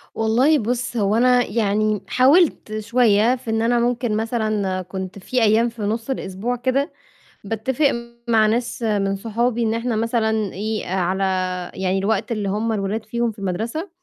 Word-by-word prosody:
والله 245 +8 +3
بُصّ 245 +1 -2
هو 205 0 +2
أنا 250 +1 +4
يعني 210 -1 0
حاولت 260 -5 +3
شوية 230 +1 +3
في 240 -2 -9
إن 225 0 +1
أنا 240 +1 +2
ممكن 240 -2 0
مثلًا 215 -4 -1
كنت 190 +1 -7
في 250 +6 -1
أيام 225 +2 +4
في 230 -1 -10
نُص 225 +4 -2
الأسبوع 225 -1 -3
كده، 260 +3 0 0.5
باتفق 245 +7 0 0.4
مع 220 -2 +4
ناس 235 +2 -1
من 200 -3 +1
صحابي 230 +3 -1
إن 220 -1 +1
إحنا 230 0 -1
مثلًا 220 -2 0
إيه، 215 +3 -3
على 185 +1 0 0.5
يعني 190 0 0
الوقت 220 +5 -1
اللي 210 -3 -1
هُم 215 +3 -1
الولاد 210 +1 -2
فيهم 235 +1 -1
في 215 - -15
المدرسة، 225 - -3
225 Hz, 160 wpm, -21 LUFS, 205-240 Hz, 0.5 s, أنا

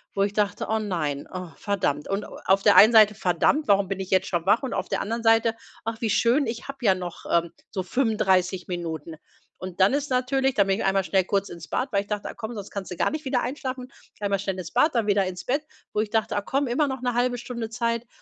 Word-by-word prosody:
wo 195 - +2
ich 200 - -1
dachte: 205 -1 -1
„Oh 220 0 +1
nein, 155 -9 -3
oh 185 -1 -5
verdammt.“ 175 -8 -2
Und 195 +1 -1
a - - -9 0.2
auf 195 +1 +4
der 205 -1 +5
einen 215 +5 +9
Seite, 215 -2 +6
„verdammt, 195 - +1
warum 200 -1 +4
bin 195 0 -3
ich 190 - -6
jetzt 190 0 +2
schon 175 -2 -2
wach“ 210 +7 +3
und 260 - -3
auf - - -3
der - - 0
anderen 230 +2 -3
Seite, 225 0 +4 0.3
„ach 225 0 -4
wie 225 - 0
schön, 240 +7 +3
ich 230 +3 -5
habe 275 0 -7
ja 200 -5 +4
noch, 180 -2 -7
ähm, 170 0 +2 0.2
so 190 - -3
35 190 -5 +1
Minuten“. 165 -3 -5 0.4
Und 185 0 -8
dann 190 +7 +5
ist 290 0 -1
natürlich 265 +1 +1
da 200 - +5
bin 195 +2 0
ich - - -2
einmal 195 0 +2
schnell 190 0 +2
kurz 200 +1 0
ins 170 -1 -9
Bad, 260 0 -2
weil 200 - +2
ich 200 - -13
dachte: 210 -1 -3
„Ach - - -13
komm, 230 0 -6
sonst 205 -1 -7
kannst 200 -2 -5
du 180 - -6
gar - - +1
nicht 310 0 -5
wieder 260 -2 +1
einschlafen.“ 255 0 -5 0.3
Einmal 200 -1 0
schnell 195 -1 -3
ins 180 -3 -6
Bad, 310 -3 +3
dann 230 -3 +2
wieder 200 -1 +3
ins 180 -1 -6
Bett, 280 +4 0 0.3
wo 210 - 0
ich 215 - -3
dachte: 220 -1 0
„Ah 205 - +1
komm, 275 +7 -1
immer 270 +4 +1
noch 265 -2 -4
'ne 250 -1 -1
0,5 245 +1 +1
Stunde 235 -2 -5
Zeit”, 230 0 -2
210 Hz, 260 wpm, -25 LUFS, 190-240 Hz, 0.4 s, einen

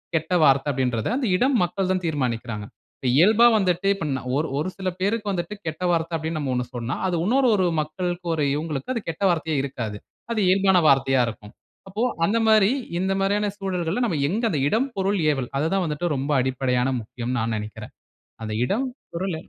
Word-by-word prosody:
கெட்ட 160 +3 -1
வார்த்த 135 0 +4
அப்படின்றத 125 -4 -1
அந்த 275 - -1
இடம், 260 +4 +2
மக்கள் 180 +2 -1
தான் 185 - -2
தீர்மானிக்கிறாங்க." 120 -8 -2 0.5
இயல்பா 215 +8 +6
வந்துட்டு 185 -1 +1
இப்ப 165 - -5
ந 130 - -2 0.2
ஒரு 160 +2 0
ஒரு 185 - -1
சில 190 -1 -2
பேருக்கு 205 +1 0
வந்துட்டு 175 +2 -3
கெட்ட 160 +3 -4
வார்த்த 165 0 0
அப்படின்னு 160 0 -3
நம்ம 140 -3 -2
1 125 - -1
சொன்னா, 120 0 -3
அது 180 - 0
இன்னொரு 255 +4 +3
ஒரு 185 - +2 0.2
மக்களுக்கு 175 +3 -4
ஒரு 150 -2 0
இவங்களுக்கும் 155 - -3
அது 230 - -3
கெட்ட 165 +5 -4
வார்த்தையே 160 -3 -1
இருக்காது. 115 -6 -4 0.3
அது 225 - 0
இயல்பான 190 -1 +4
வார்த்தையா 135 -2 +3
இருக்கும். 105 -2 -8 0.4
அப்போ 205 +4 -4 0.2
அந்த 215 +6 +1
மாதிரி, 215 0 +5 0.3
இந்த 190 +1 0
மாதிரியான 205 +1 +1
சூழல்கள்ல 185 +2 -2
நம்ம 165 - -1
எங்க 220 +7 -1
அந்த 150 - 0
"இடம், 250 +5 +1
பொருள், 195 0 +1
ஏவல்" 130 -3 -3
அது 155 - +1
தான் 190 - +1
வந்துட்டு 155 +2 -2
ரொம்ப 140 +2 -2
அடிப்படையான 125 -1 0
முக்கியம்ன்னு 120 +3 -4
நான் 115 0 -1
நினைக்கிறேன். 105 +1 -8 0.5
அந்த 110 - -4
இடம் 245 - 0 0.3
பொருள் 180 0 -2
165 Hz, 185 wpm, -24 LUFS, 130-195 Hz, 0.5 s, இயல்பா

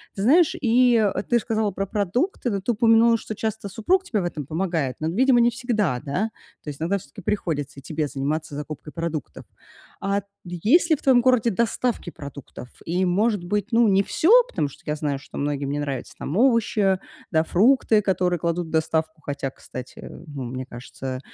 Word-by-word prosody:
Ты 195 - -4
знаешь, 310 - +4
и 240 -1 +4 0.3
ты 240 - +4
сказала 220 -2 -1
про 195 +2 -3
продукты, 240 - -1
но 200 -2 -2
ты 240 - 0
упомянула, 230 +1 +4
что 215 -1 -7
часто 220 -2 -3
супруг 365 - +1
тебе 220 - -1
в - - -3
этом 155 -5 -4
помогает, 160 -5 -1
но, 155 - -2
видимо, 250 +6 +4
не 235 0 +5
всегда, 215 - -1
да? 180 +10 -1 0.3
То 150 - -6
есть 140 - -8
иногда 190 +5 +1
всё-таки 140 -4 -13
приходится 145 -9 -2
и - - -13
тебе 155 -2 -2
заниматься 145 +2 -3
закупкой 150 0 -7
продуктов. 165 -3 -5 0.5
А 200 +1 0 0.2
есть 210 - +2
ли 315 - +7
в - - -13
твоем 255 -3 +5
городе 245 -2 +3
доставки 230 -2 -1
продуктов? 140 -3 -10 0.2
И, 180 +3 0
может 205 +1 +1
быть, 205 +2 -1
ну, 230 0 +4
не 195 0 +4
всё, 320 - 0 0.2
потому 150 - -1
что - - -17
я 150 - -1
знаю, 145 -2 -2
что - - -11
многим 140 -1 -2
не 145 - -2
нравится 140 -4 -4
там 160 - -3
овощи, 220 -6 +3 0.3
да, 160 -1 +3
фрукты, 220 +4 +3
которые 180 -3 +1
кладут 170 +1 -1
в - - -11
доставку, 160 0 -1
хотя, 140 -1 -3
кстати, 130 -1 -10 0.2
мне 130 -3 -5
кажется, 130 +1 -7
185 Hz, 185 wpm, -23 LUFS, 150-225 Hz, 0.5 s, ли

